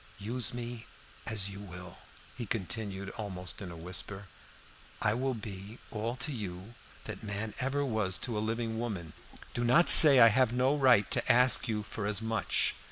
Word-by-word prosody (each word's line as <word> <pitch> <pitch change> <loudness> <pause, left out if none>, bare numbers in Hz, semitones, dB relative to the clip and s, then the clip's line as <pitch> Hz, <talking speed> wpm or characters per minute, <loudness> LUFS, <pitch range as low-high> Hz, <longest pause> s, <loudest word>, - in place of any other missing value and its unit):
"Use 115 +5 0
me 120 -1 -7 0.4
as 105 -3 -1
you 100 0 -10
will," 90 -3 -11 0.4
he 120 - -7
continued 100 -1 -5
almost 90 -7 -5
in 95 - -7
a 85 - -10
whisper. 90 +3 -5 0.7
"I 105 - +1
will 130 +2 -2
be 105 0 -9
all 115 +2 -4
to 150 - -6
you 100 -3 -8 0.3
that - - -8
man 105 0 -5
ever 140 +2 -2
was 110 -7 -1
to 120 -3 -5
a - - -2
living 115 0 -4
woman. 100 -9 -6 0.4
Do 120 - -3
not 130 +9 +5
say 145 -5 +10
I 115 - +8
have 120 +1 +1
no 130 +3 +1
right 125 -8 +3
to - - +2
ask 125 +1 +4
you 105 -2 -3
for 105 -1 -6
as 105 -1 0
much. 110 -2 -1
110 Hz, 175 wpm, -29 LUFS, 100-120 Hz, 0.7 s, say